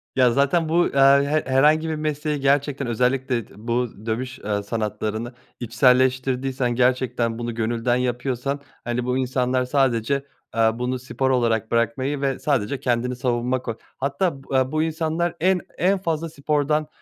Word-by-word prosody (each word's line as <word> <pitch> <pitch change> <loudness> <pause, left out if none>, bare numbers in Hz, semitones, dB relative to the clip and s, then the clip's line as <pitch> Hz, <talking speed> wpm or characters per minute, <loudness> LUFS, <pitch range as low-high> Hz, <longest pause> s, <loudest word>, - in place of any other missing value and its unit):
Ya 130 -2 +4
zaten 140 +5 +2
bu, 170 +2 +3
eee, - - -8 0.3
he 155 +1 +1
herhangi 155 +4 +4
bir 160 - -1
mesleği 150 -1 -2
gerçekten 140 0 +1
özellikle 125 0 0
d - - -19
bu 115 -1 -3
dövüş, 125 +4 -3
eee, 105 -1 -2
sanatlarını 110 +2 -3 0.3
içselleştirdiysen 130 +1 +2
gerçekten 125 -2 +1
bunu 120 -1 -4
gönülden 115 +2 0
yapıyorsan, 125 +2 -2 0.2
hani, 120 +1 -2
bu 125 +1 0
insanlar 130 0 0
sadece, 135 0 +1 0.3
eee, 115 0 +4
bunu 125 +2 -2
spor 130 +1 -2
olarak 115 -3 +1
bırakmayı 130 +5 0
ve 135 -2 -1
sadece 135 -2 0
kendini 125 0 0
savunma 125 0 -1
koy 115 -3 -4 0.2
Hatta 140 +2 -1
b 135 - -4
eee, 130 0 +1
bu 155 0 +1
insanlar 160 +1 -1
en 185 +2 +3 0.2
en 190 +3 +2
fazla 165 -3 -2
spordan, 150 0 0
130 Hz, 150 wpm, -23 LUFS, 120-145 Hz, 0.3 s, Ya